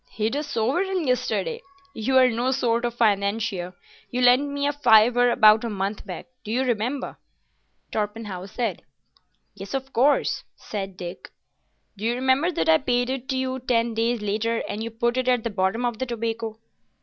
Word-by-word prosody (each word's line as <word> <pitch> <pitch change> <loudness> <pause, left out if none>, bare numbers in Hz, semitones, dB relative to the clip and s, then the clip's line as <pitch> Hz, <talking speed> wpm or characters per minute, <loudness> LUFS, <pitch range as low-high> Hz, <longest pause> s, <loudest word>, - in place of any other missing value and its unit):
"Hid 220 +4 -2
a 290 - 0
sovereign 320 - -1
yesterday! 265 - -1 0.3
You're 255 +3 +3
no 240 +3 0
sort 240 -2 +1
of 240 -1 -2
financier. 200 -4 0 0.3
You 250 - -2
lent 250 +4 +5
me 285 0 -2
a 290 - +1
fiver 245 -2 +5
about 215 -1 +6
a 235 - -2
month 200 +1 -3
back. 180 - -6 0.2
Do 210 - -6
you 250 +3 +1
remember?" 250 +3 -2 0.7
Torpenhow 210 -3 -4
said. 235 +4 -3 0.7
"Yes, 200 +3 -7
of 270 0 -5
course." 275 +5 +2 0.3
"Do 190 -3 -5 0.8
you 225 +4 -1
remember 260 +7 +2
that 165 - -1
I 160 0 +6
paid 245 0 0
it 265 +1 -4
you 260 0 -1
ten 235 -2 0
days 230 0 0
later, 220 +3 -1
and 215 +2 -4
you 230 - -3
put 235 +2 -1
it 255 0 0
at 250 -3 +2
the 230 - -2
bottom 200 +5 0
of 240 -2 -2
the 260 - -2
tobacco?" 225 -1 -3
235 Hz, 165 wpm, -24 LUFS, 215-255 Hz, 0.8 s, about